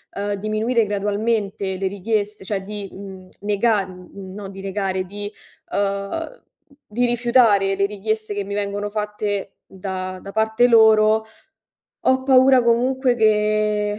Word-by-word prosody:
uhm, 205 0 -2
diminuire 215 +3 0
gradualmente 205 -1 -1
le 190 +1 -1
richieste, 205 +1 -2
cioè 195 -1 -3
di, 205 0 -6
mhmm, 190 -1 -10
nega 205 0 +1
no 190 +2 -10
di 195 0 -9
negare, 195 -1 -2
di 205 +2 -7 0.4
uhm, 200 - -2 0.5
di 240 +4 0
rifiutare 235 -5 +3
le 200 +1 +1
richieste 215 +1 -3
che 205 -1 -3
mi 200 - -5
vengono 205 0 -2
fatte 210 -2 -3
da 185 -1 -6
da 195 - -9
parte 220 +3 +2
loro, 220 -1 +5 0.8
ho 260 0 +2
paura 260 -1 +5
comunque 250 +2 +2
che 210 -1 +2
205 Hz, 130 wpm, -21 LUFS, 195-220 Hz, 0.8 s, loro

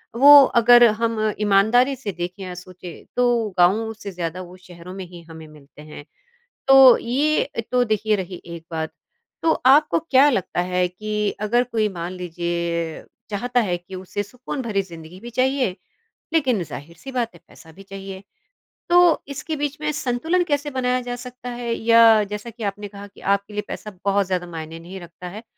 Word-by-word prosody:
वो 285 +3 +9 0.2
अगर 240 +1 +7 0.2
हम 220 -2 0
ईमानदारी 220 +7 +3
से 235 -6 -5
देखें 180 +2 -6
या 185 -1 -6
सोचें 180 -1 -11
तो 240 -3 +2
गाँव 210 +6 +3
से 205 -2 -8
ज़्यादा 175 0 -4
वो 180 0 -11
शहरों 180 -1 -12
में 190 -1 -7
ही 175 -1 -12
हमें 160 -1 -11
मिलते 150 -1 -16
हैं। 150 -1 -11 0.6
तो, 270 -2 +9
ये 285 +5 0 0.2
तो 250 0 +2
देखिए 215 -1 0
रही 185 -2 -6
एक 170 -1 -9
बात। 160 -1 -3 0.5
तो 325 - +3
आपको 295 +3 +5
क्या 285 -3 +4
लगता 185 -7 -1
है 180 0 +2
कि 210 +3 -2
अगर 235 +4 +2
कोई 225 -3 -1
मान 175 0 -5
लीजिए 170 -2 -3 0.3
चाहता 245 +4 0
है 185 -6 -1
कि 175 +2 -13
उसे 185 +2 -4
सुकून 250 +6 -7
भरी 210 -5 -1
ज़िंदगी 170 -1 -12
भी 240 +2 -9
चाहिए, 255 -4 0 0.6
लेकिन 260 - +1
ज़ाहिर-सी 170 - -10
बात 240 -5 -2
है 170 - -16
पैसा 160 - -16
भी 190 +5 -14
चाहिए, 195 -1 -9 0.7
तो 350 -1 +5
इसके 285 +3 -5
बीच 290 0 -3
में 300 0 -1
संतुलन 300 +6 0
कैसे 290 -3 -1
बनाया 255 -2 -1
जा 245 0 -5
सकता 250 0 -9
है? 240 -1 -3
या 230 -1 +5
जैसा 210 +3 -6
कि 230 0 -10
आपने 205 0 -4
कहा 200 0 -11
कि 200 - -19
आपके 200 +1 -9
लिए 210 - -2
पैसा 210 - -7
बहुत 200 0 +2
ज़्यादा 180 -1 -2
मायने 165 -1 -8
नहीं 180 +3 -9
रखता 175 +1 -11
है, 210 +5 -9
210 Hz, 180 wpm, -22 LUFS, 180-245 Hz, 0.7 s, वो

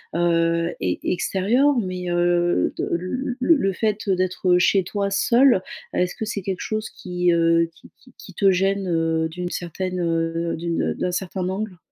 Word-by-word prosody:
heu, 170 0 +2
e - - -7 0.3
extérieurs, 215 +10 +1
mais 185 -3 -4
heu, 175 0 +2
de - - -2
le 245 +9 -2
le 330 +6 +5
le 195 -9 0
fait 210 +1 -1
d'être 185 -1 +2
chez 190 +1 +3
toi 200 +2 -2
seul, 245 +6 +4
heu, 185 - -6
est-ce 180 0 0
que - - -5
c'est 210 -2 -3
quelque 190 -2 -3
chose 215 0 -3
qui, 180 -1 -1
heu, 165 0 +3
qui - - -18
qui 250 -1 -21
qui 190 - -12
te 195 +2 +3
gêne, 195 +1 0
heu 165 -1 +1
d'une 175 +2 -5
certaine, 180 +1 -4
heu, 165 0 -1
d'une 170 0 -1
d'un 180 - -2
certain 180 0 -3
angle? 195 0 -4
180 Hz, 175 wpm, -22 LUFS, 170-200 Hz, 0.3 s, le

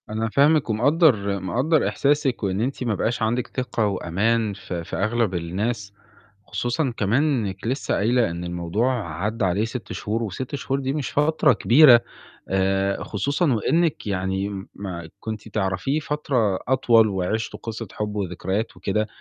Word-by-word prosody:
أنا 110 +1 -2
فاهمِك 145 +3 +3
ومقدّر، 110 - +3
مقدّر 130 - +1
إحساسِك 140 -4 +1
وإن 95 +1 0
أنتِ 130 +2 -2
ما 115 -4 0
بقاش 120 +4 -1
عندِك 115 +2 0
ثقة 125 -4 -2
وأمان 105 +4 0
في 90 -3 -6
في - - -6
أغلَب 110 -1 0
الناس. 100 +5 -3 0.5
خصوصًا 125 +2 -1
كمان 115 +7 +2
إنِّك 110 -10 -1
لسّه 130 +4 -1
قايلة 115 -1 +2
إن 85 +1 -5
الموضوع 90 +3 -1
عدّى 110 0 0
عليه 95 +4 +1
6 115 +1 -6
شهور 110 +3 -2
و6 120 +7 -4
شهور 135 0 -2
دي 135 0 -2
مش 145 -4 -3
فترة 150 -1 +3
كبيرة، 120 +2 +7 0.5
آآ، 95 +1 +1
خصوصًا 140 - 0
وإنِّك 160 - +1
يعني 95 0 -2
ما 85 -5 -6
كنتِ 110 0 -6
تعرفيه 100 - -1
فترة 135 -9 0
أطول 120 -4 +4
وعِشتوا 100 +3 -2
قِصّة 115 -1 -5
حُب 105 0 -4
وذكريات 95 +2 -3
وكده، 100 +3 -1
110 Hz, 145 wpm, -23 LUFS, 95-130 Hz, 0.5 s, كبيرة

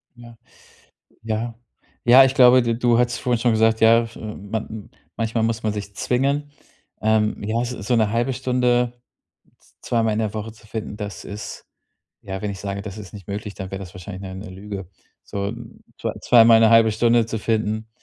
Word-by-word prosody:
Ja, 120 -1 -14 0.9
ja. 115 +1 -3 0.5
Ja 130 +3 +8
ich 130 - 0
glaube, 125 0 +7
du 115 -1 0
du 120 0 +2
hattest 120 -1 +1
vorhin 125 -3 0
schon 120 0 +2
gesagt: 110 0 +3
„Ja, 115 +1 +6
f 115 -1 -10
man 110 0 -6 0.3
manchmal 115 0 -1
muss 115 0 -1
man 110 -1 0
sich 100 -1 -7
zwingen." 140 +6 0 0.5
Ähm, 110 0 +1
ja, 110 +3 -1
so 125 -3 -6
so 115 +5 0
'ne 110 -2 +2
halbe 120 +3 0
Stunde 125 -1 +1 0.7
z - - -28
zweimal 115 -2 0
in 105 - -1
der 110 -2 -1
Woche 110 +1 -5
zu 110 - -20
finden, 110 -1 -6
das 100 -4 -6
ist 100 +1 -8 0.6
ja, 95 -1 -5
wenn 105 - -2
ich 95 - -8
sage, 100 0 -4
das 105 -1 -7
ist 100 -5 -11
nicht 100 -4 -11
möglich, 100 0 -5
dann 95 -2 -6
wär 95 - -4
das 95 -2 -9
wahrscheinlich 95 +1 -8
'ne 95 -1 -7
'ne 100 +2 -8
Lüge. 95 -1 -8 0.3
So 100 +1 -4 0.4
zwei - - -2
zweimal 115 -2 +7
'ne 110 - +6
halbe 115 -1 +6
Stunde 115 +1 +3
zu 115 - -3
finden, 110 0 -1
110 Hz, 195 wpm, -22 LUFS, 105-120 Hz, 0.9 s, Ja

